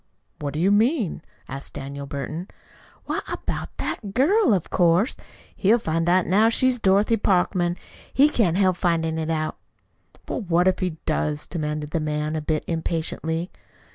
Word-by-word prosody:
"What 145 -1 -4
do - - -1
you 190 +4 +3
mean?" 220 - +2 0.3
asked 135 +1 -8
Daniel 140 +1 -6
Burton. 145 +6 -5 0.6
"Why, - - -1
about - - -4
that 200 -3 -4
girl, 320 - +4
of 190 -5 0
course. 175 - +3 0.4
He'll 220 +4 +4
find 165 -5 -1
out 180 0 +4
now 210 +5 +4
she's 255 +1 +2
Dorothy 205 +3 +3
Parkman. 180 -3 +1 0.3
He 280 +2 +5
can't 200 - +1
help 185 -2 +3
findin' 165 -3 0
it 160 0 -3
out!" 155 -1 -1 0.7
"Well, - - -3
what 175 -2 +2
if 185 - +2
he 180 -4 -2
does?" 150 -1 -1
demanded 150 -2 -4
the 165 - 0
man, 150 0 -2
a 155 - -1
bit 155 0 -1
impatiently. 165 +1 -2
175 Hz, 160 wpm, -24 LUFS, 155-200 Hz, 0.7 s, He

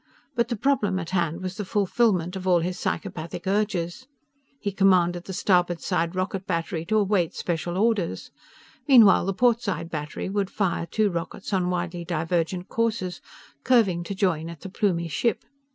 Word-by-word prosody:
But 235 -1 +1
the 240 - -2
problem 210 -5 +1
at 170 -2 -5
hand 170 -2 0
was 185 +1 -4
the 210 - -2
fulfillment 195 -2 +1
of 190 0 -5
all 175 -2 +4
his 180 +2 -3
psychopathic 165 0 -4
urges. 200 +2 -1 0.5
He 200 - -2
commanded 180 -3 +3
the - - -6
starboard 175 -2 +2
side 170 -1 -1
rocket 185 0 -2
battery 165 0 -2
to 215 +5 +1
await 195 -5 +1
special 175 +1 -2
orders. 215 -4 0 0.6
Meanwhile 225 -9 +7
the 195 - +1
port 240 +1 +3
side 180 -7 -3
battery 150 -2 -4
would 195 0 -1
fire 180 -4 -1
two 215 +1 +1
rockets 170 +4 -5
on 180 -2 +1
widely 175 -1 -2
divergent 170 +2 -1
courses, 220 -6 -1 0.4
curving 205 -9 +3
to 200 - -4
join 170 -5 0
at 170 -2 -10
the 190 - -7
Plumie 180 -4 0
ship. 200 - -1
185 Hz, 170 wpm, -25 LUFS, 170-205 Hz, 0.6 s, Meanwhile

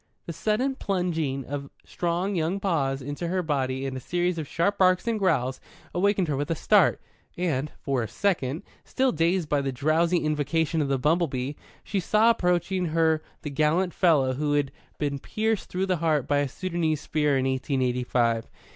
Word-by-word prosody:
The 170 - -5
sudden 220 - 0
plunging 165 - -2
of 140 +1 -5 0.2
strong 175 +3 -1
young 175 +2 0
paws 140 -9 0
into 145 +5 -4
her 180 +1 0
body 135 -3 -1
and 135 -1 -3
a - - -4
series 175 +5 -1
of 155 - -4
sharp 170 +7 0
barks 185 +3 +3
and 225 -2 0
growls 135 -9 +1 0.3
awakened 195 0 +2
her 150 - 0
with 145 +3 -2
a 165 - +1
start, - - +4 0.4
and, 150 -5 -1
for 135 -3 -1
a 110 - -2
second, 160 - -1 0.2
still 260 -1 +1
dazed 170 +1 +1
by 145 -1 +1
the 135 -1 -2
drowsy 155 +6 +2
invocation 155 +1 0
of 145 - 0
the 135 0 +1
bumble 165 +6 +2
bee, 130 +1 -3 0.3
she 200 - -2
saw 215 +5 +4
approaching 180 -2 0
her 160 -1 +2 0.2
the 150 - -4
gallant 160 +5 +1
fellow 145 -8 +3
who 145 +2 -1
had 145 -2 +1 0.3
been 140 -2 -2
pierced 220 +5 -2
through 185 +1 -1
the 185 -2 0
heart 155 -4 +1
by 145 -1 +2
a 145 - +1
Soudanese 165 -1 -1
spear 150 -3 +1
in 130 - 0
eighteen 130 0 0
eighty 125 0 0
five. 115 -2 0
160 Hz, 190 wpm, -26 LUFS, 140-180 Hz, 0.4 s, start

